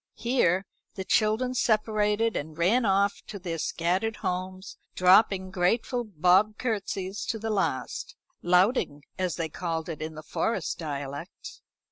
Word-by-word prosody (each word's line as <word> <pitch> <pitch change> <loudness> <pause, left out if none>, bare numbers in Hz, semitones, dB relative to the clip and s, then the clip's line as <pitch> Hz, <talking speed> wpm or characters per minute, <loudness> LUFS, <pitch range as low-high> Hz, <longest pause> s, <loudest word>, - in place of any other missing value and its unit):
Here 205 -7 +1 0.3
the 190 - -4
children 220 +6 +2
separated, 215 -1 +1
and 155 +1 -5
ran 215 +9 +3
off 200 0 +2
to 205 - -6
their 175 -3 -4
scattered 185 +9 0
homes, 185 +1 -4 0.2
dropping 185 0 +4
grateful 225 +7 +1
bob 195 +2 +3
curtsies 200 -4 -3
to 225 - -2
the 220 0 -3
last 160 -11 -2 0.3
"louting," 180 - +2 0.2
as 185 -2 0
they 165 -2 -2
called 165 0 -4
it 155 -2 -5
in 155 0 -5
their 155 - -8
Forest 225 +8 -2
dialect. 145 +1 -6
190 Hz, 135 wpm, -27 LUFS, 170-215 Hz, 0.3 s, dropping